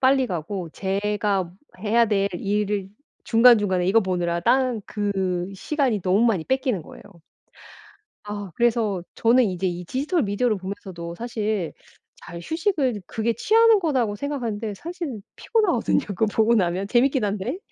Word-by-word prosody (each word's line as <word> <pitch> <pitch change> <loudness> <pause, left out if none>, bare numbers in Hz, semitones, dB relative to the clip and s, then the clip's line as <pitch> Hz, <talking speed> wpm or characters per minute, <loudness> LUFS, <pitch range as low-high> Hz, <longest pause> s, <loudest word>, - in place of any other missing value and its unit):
빨리 265 0 +4
가고 175 -1 -4
제가 200 -1 -1 0.3
해야 225 +3 +3
될 200 -2 +1
일을 205 0 -1 0.4
중간중간에 215 -6 +5
이거 210 +5 +4
보느라 175 -3 -1
딴 255 +3 +2
그 190 -3 -2
시간이 260 0 -1
너무 195 +5 +3
많이 215 -8 +2
뺏기는 260 - 0
거예요. - - -13 1.2
아 205 -2 -6
그래서 220 -6 +1
저는 240 +3 +4
이제 185 -2 -1
이 175 0 -4
디지털 285 - -1
미디어를 210 +2 0
보면서도 185 -3 -7
사실 215 -5 -3 0.5
잘 170 0 -8
휴식을 315 - -1
그게 225 +4 -1
취하는 450 - +4
거라고 260 - 0
생각하는데 225 -4 -3
사실은 320 - -6
피곤하거든요 405 - +1
그거 205 +1 0
보고 220 +2 +2
나면 185 -1 0
재밌긴 255 +2 +2
한데. 210 - -2
210 Hz, 320 characters per minute, -23 LUFS, 190-250 Hz, 1.2 s, 중간중간에